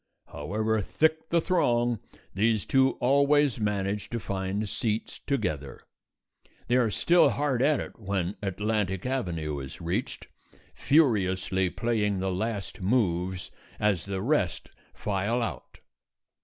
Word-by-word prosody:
However 110 +8 -1
thick 160 - 0
the 170 - +3
throng, 120 - +1 0.3
these 110 +1 +1
two 135 -1 +3
always 140 0 +3
manage 105 -1 -1
to 120 - -3
find 95 +2 -2
seats 110 +1 -2
together. 75 - -2 0.9
They 125 - +2
are 120 -3 +3
still 170 - +4
hard 140 -4 0
at 145 +2 +3
it - - -7
when 95 -2 -2
Atlantic 100 -1 -1
Avenue 85 - -2
is 65 0 -8
reached, 85 +1 -3 0.5
furiously 95 - +2
playing 105 +1 0
the 95 0 -1
last 100 +1 -3
moves 95 -4 0 0.3
as 100 -5 +1
the 95 -1 -3
rest 115 - 0 0.2
file 105 +4 -1
out. - - -6
105 Hz, 120 wpm, -28 LUFS, 95-125 Hz, 0.9 s, still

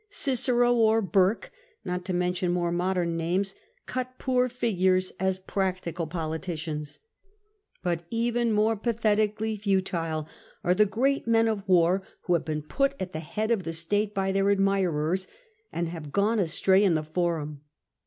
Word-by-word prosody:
Cicero 245 - +2
or 225 -1 +4
Burke, 195 +1 +1 0.3
not 180 0 -3
to 185 - -2
mention 180 0 0
more 175 -1 0
modern 175 -1 0
names, 185 +4 0 0.3
cut 255 0 -4
poor 255 -1 +1
figures 185 -6 +1
as 190 0 +1
practical 185 -3 -2
politicians, 160 -2 -4 0.9
but 170 -2 0
even 235 0 0
more 215 +1 +2
pathetically 215 -1 0
futile 175 -6 -1 0.4
are 180 - +3
the 210 +3 +4
great 265 +6 0
men 225 0 +4
of 215 -2 -1
war 180 +1 +4 0.2
who 180 - 0
have 170 - +2
been 155 -1 -3
put 275 - 0
at 185 -1 -4
the 155 - -4
head 215 +8 -3
of 225 -4 +2
the 165 - -4
state 205 +6 0
by 195 0 0
their 195 +1 +2
admirers, 190 -3 +1 0.4
and 170 0 -2
have 160 -4 -7
gone 210 +6 +2
astray 190 +2 +3
in 185 -5 +3
the 155 - 0
Forum. 155 -3 -2
190 Hz, 155 wpm, -27 LUFS, 170-220 Hz, 0.9 s, or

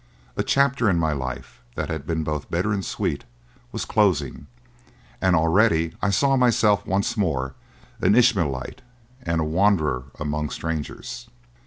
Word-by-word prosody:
A - - 0
chapter 140 -4 +2
in 90 - +2
my 80 -2 +1
life 65 -3 -6
that - - -3
had 80 -2 -4
been 80 -1 -1
both 75 -1 -4
bitter 95 +5 0
and 100 -1 -2
sweet - - -2 0.5
was - - -4
closing, - - +1 0.7
and 95 -1 +3
already 80 0 +3
I 100 - +1
saw 135 +7 +3
myself 115 -5 +3
once 100 +3 0
more 70 - -1 0.5
an 100 +3 +4
Ishmaelite 100 - +1 0.4
and 85 -4 -1
a - - +1
wanderer 80 -6 +1
among 75 0 -2
strangers. 85 +9 -5
85 Hz, 145 wpm, -23 LUFS, 75-105 Hz, 0.7 s, an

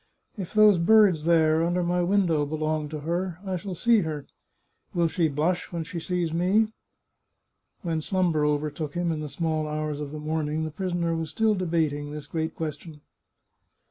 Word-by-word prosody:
If 195 -2 -7
those 210 -4 +6
birds 185 -4 +5
there, 160 -1 +4
under 175 +1 +1
my 175 +1 +1
window, 175 -4 +2
belong 155 0 -2
to 155 -1 -6
her, 170 +2 -2
I 190 -1 -2
shall 185 +1 -5
see 235 +5 +4
her.... 155 -6 -3 0.7
Will 170 -1 +3
she 165 0 +1
blush 155 +5 -1
when 170 -2 -3
she 170 +2 -6
sees 175 -1 -2
me? 195 +6 +2 0.6
" - - -50
When 165 -3 -1
slumber 175 -3 +1
overtook 150 +1 -1
him, 175 -1 0
in 160 - -2
the 150 -1 -5
small 155 +1 -1
hours 150 -1 -3
of 145 -1 -5
the 155 - -6
morn 155 0 -2
ing, 155 +1 -1
the 155 - -4
prisoner 175 -1 -1
was 165 -1 -3
still 220 +5 +2
debating 160 -6 -1
this 150 0 -7
great 160 +1 -3
question. 155 -1 -6
165 Hz, 180 wpm, -26 LUFS, 155-180 Hz, 0.7 s, those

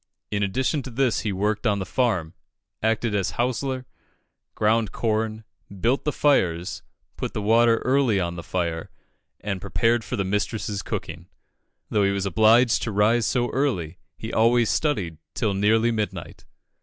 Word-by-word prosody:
In 105 -1 -1
addition 130 +9 0
to 130 - -8
this 125 0 +1
he 110 - -2
worked 105 +4 -1
on 105 -2 +2
the 95 - -3
farm, 95 -7 0 0.5
acted 110 0 0
as 100 -2 0
hostler, 130 +1 -1 0.7
ground 110 -1 +2
corn, 110 -1 -1 0.4
built 120 +8 +1
the 150 - +1
fires, 90 - +1 0.4
put - - -4
the - - -1
water 115 +2 +4
early 130 -6 +3
on 85 -1 -2
the 85 - -6
fire, 85 -1 -3 0.5
and 100 -3 -3
prepared 110 +6 +1
for 125 - -4
the 100 - 0
mistress's 105 +1 -2
cooking. 85 -1 -6 0.6
Though 105 - +2
he 100 - +3
was 100 0 -1
obliged 110 +5 +4
to 110 - -2
rise 105 +3 +3
so 120 -1 0
early, 95 - -1 0.2
he 110 - -6
always 115 0 +3
studied 95 - -1 0.2
till 110 -5 0
nearly 110 +4 +3
midnight. 105 -7 -4
110 Hz, 155 wpm, -24 LUFS, 95-120 Hz, 0.7 s, water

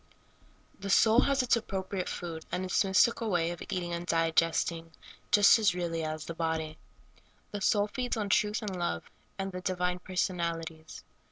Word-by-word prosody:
THE 200 0 -5
soul 220 +3 +5
has 275 -1 +2
its 245 - +3
appropriate 195 -4 -3
food, 165 -2 -5
and 185 - -2
its 185 - +2
mystical 220 +4 +3
wa}' 170 -3 +1
of 175 - -11
eating 180 -3 -3
and 170 +1 -4
digesting, 165 0 +1 0.4
just 205 +2 +6
as 205 -5 +3
really 170 -2 -2
as 155 0 -4
the 165 - -5
body. 160 -1 -3 0.7
The 205 -2 -5
soul 205 +1 +3
feeds 245 +3 -3
on 210 -2 -2
truth 210 +3 +1
and 200 -3 -4
love, 175 - -3 0.3
and 195 0 -3
the 180 0 -6
di 185 0 -1
vine 180 0 -1
personalities. 170 -3 -3
180 Hz, 170 wpm, -30 LUFS, 165-205 Hz, 0.7 s, just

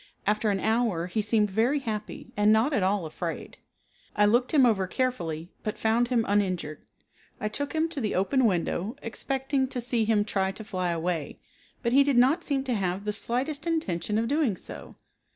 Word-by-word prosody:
After 210 +1 +1
an 195 -1 +1
hour 220 -6 +1
he 185 +5 -1
seemed 210 -1 +1
very 230 +8 +2
happy 220 -6 -5
and 210 +1 +4
not 225 +7 +3
at 240 - +2
all 190 -1 +1
afraid. 165 +2 -6 0.6
I 210 - +4
looked 240 +4 +3
him 280 -5 +5
over 200 -6 +2
carefully, 175 -10 -2
but 215 - -4
found 230 +2 +2
him 235 -2 +1
uninjured. 185 -7 0 0.6
I 210 - -1
took 285 +6 -3
him 320 0 +1
to 290 -4 -4
the 215 - -1
open 245 +8 +2
window 190 +3 -1
expecting 265 +3 -1
to 255 - -4
see 240 -2 0
him 210 -2 +2
try 195 -2 0
to 220 - -9
fly 185 -4 -2
away, 170 -2 -2 0.5
but 235 0 +1
he 280 +1 +7
did 275 -3 +1
not 275 +8 +4
seem 275 -2 0
to 260 -2 -1
have 195 -1 -2
the 210 - -1
slightest 275 +8 -2
intention 210 - -1
of 230 +1 0
doing 275 - +1
so. - - -10
220 Hz, 190 wpm, -27 LUFS, 195-255 Hz, 0.6 s, he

